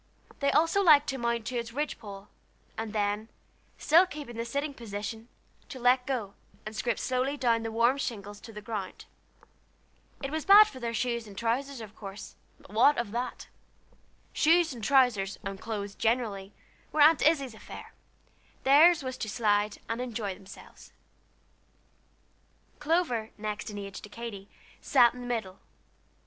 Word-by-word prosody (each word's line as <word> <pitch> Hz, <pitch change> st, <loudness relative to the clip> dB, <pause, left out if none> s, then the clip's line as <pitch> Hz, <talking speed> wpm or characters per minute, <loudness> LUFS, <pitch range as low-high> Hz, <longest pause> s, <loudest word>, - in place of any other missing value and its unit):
They 280 Hz, -, +2 dB
also 330 Hz, +6 st, +3 dB
liked 300 Hz, -5 st, +6 dB
to 270 Hz, -1 st, -3 dB
mount 235 Hz, -1 st, -1 dB
to 245 Hz, 0 st, -2 dB
the 230 Hz, -1 st, -10 dB
ridge 295 Hz, +3 st, -3 dB
pole, 200 Hz, -2 st, -10 dB, 0.5 s
and 225 Hz, -1 st, -4 dB
then, 210 Hz, +1 st, -1 dB, 0.5 s
still 340 Hz, +5 st, +5 dB
keeping 290 Hz, -8 st, -8 dB
the 230 Hz, +1 st, -3 dB
sitting 280 Hz, +5 st, -3 dB
position, 225 Hz, -1 st, -6 dB, 0.4 s
to 265 Hz, -, -7 dB
let 250 Hz, +1 st, +3 dB
go, 230 Hz, -8 st, -2 dB, 0.3 s
and 215 Hz, +1 st, -7 dB
scrape 230 Hz, +2 st, -1 dB
slowly 260 Hz, +3 st, -1 dB
down 240 Hz, -4 st, +2 dB
over 225 Hz, -, -6 dB
the 225 Hz, -, -3 dB
warm 235 Hz, +4 st, +3 dB
shingles 205 Hz, -6 st, -5 dB
to 230 Hz, -, -11 dB
the 210 Hz, -1 st, -9 dB
ground. 210 Hz, -4 st, -6 dB, 1.2 s
It 275 Hz, -, -3 dB
was 315 Hz, 0 st, -2 dB
bad 410 Hz, +2 st, +9 dB
for 265 Hz, -, -10 dB
their 235 Hz, -1 st, -3 dB
shoes 235 Hz, -1 st, -2 dB
and 200 Hz, -2 st, -12 dB
trousers, 245 Hz, +3 st, -2 dB
of 220 Hz, -1 st, -10 dB
course, 195 Hz, -1 st, -9 dB, 0.3 s
but -, -, -17 dB
what 255 Hz, +7 st, +5 dB
of 235 Hz, -4 st, -2 dB
that? 245 Hz, +3 st, -4 dB, 0.9 s
Shoes 330 Hz, -1 st, +3 dB
and 235 Hz, -3 st, -9 dB
trousers, 230 Hz, -7 st, +3 dB
and 195 Hz, -1 st, -6 dB
clothes 205 Hz, -3 st, -4 dB
generally, 215 Hz, -4 st, -1 dB, 0.4 s
were 305 Hz, -, +1 dB
Aunt 310 Hz, +2 st, +7 dB
Izzie's 280 Hz, -6 st, +2 dB
affair; 220 Hz, -, -11 dB, 0.7 s
theirs 305 Hz, +4 st, +6 dB
was 260 Hz, 0 st, -5 dB
to 215 Hz, -, -3 dB
slide 210 Hz, -2 st, +1 dB
and 230 Hz, +2 st, -3 dB
enjoy 225 Hz, -5 st, -3 dB
themselves. 195 Hz, +1 st, -14 dB, 1.9 s
Clover, 295 Hz, -8 st, 0 dB
next 210 Hz, 0 st, -4 dB
in 210 Hz, -, -7 dB
age 200 Hz, -1 st, -7 dB
to 210 Hz, -, -11 dB
Katy, 210 Hz, -3 st, -8 dB, 0.3 s
sat 245 Hz, -4 st, +5 dB
in 250 Hz, -, -9 dB
the 245 Hz, -, -7 dB
middle. 215 Hz, -6 st, -3 dB
235 Hz, 160 wpm, -29 LUFS, 210-270 Hz, 1.9 s, bad